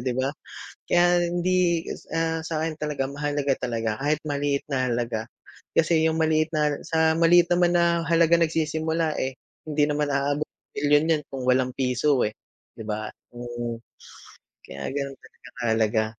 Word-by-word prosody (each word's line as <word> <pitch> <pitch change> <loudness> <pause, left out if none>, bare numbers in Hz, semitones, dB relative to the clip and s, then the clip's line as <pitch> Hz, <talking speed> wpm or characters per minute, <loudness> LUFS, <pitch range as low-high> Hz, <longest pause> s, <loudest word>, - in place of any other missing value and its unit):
'di 125 - 0
ba? 130 +1 0 0.6
Kaya 175 0 +4
hindi, 175 -1 +1 0.3
ah, 165 0 0
sa'kin 160 -1 -2
talaga 150 -3 -2
mahalaga 145 -1 -1
talaga, 115 -3 -2
kahit 150 +1 +1
maliit 145 -1 0
na 130 -2 +1
halaga, 115 -2 -2 0.5
kasi 160 0 +3
'yong 160 0 +1
maliit 155 0 +2
na 150 -1 +1
sa 160 0 +2
maliit 175 +1 +5
naman 175 0 +3
na 170 -1 +3
halaga 170 0 +4
nagsisimula 160 0 0
eh. 130 0 -2 0.3
Hindi 150 -1 +1
naman 150 0 0
aabot 145 +2 0
ng - - -73
milyon 145 +2 +3
yan - - -8
kung 135 -2 -5
walang 130 0 +2
piso 130 +1 +1
eh, 105 - +1 0.5
'di 110 - -7
ba? 110 0 -3 0.2
Mm, 120 -1 -5 0.9
kaya 70 +1 -8
gano'n 140 -1 -4
talaga - - -17
kahalaga. 110 -1 +1
150 Hz, 150 wpm, -25 LUFS, 130-165 Hz, 0.9 s, maliit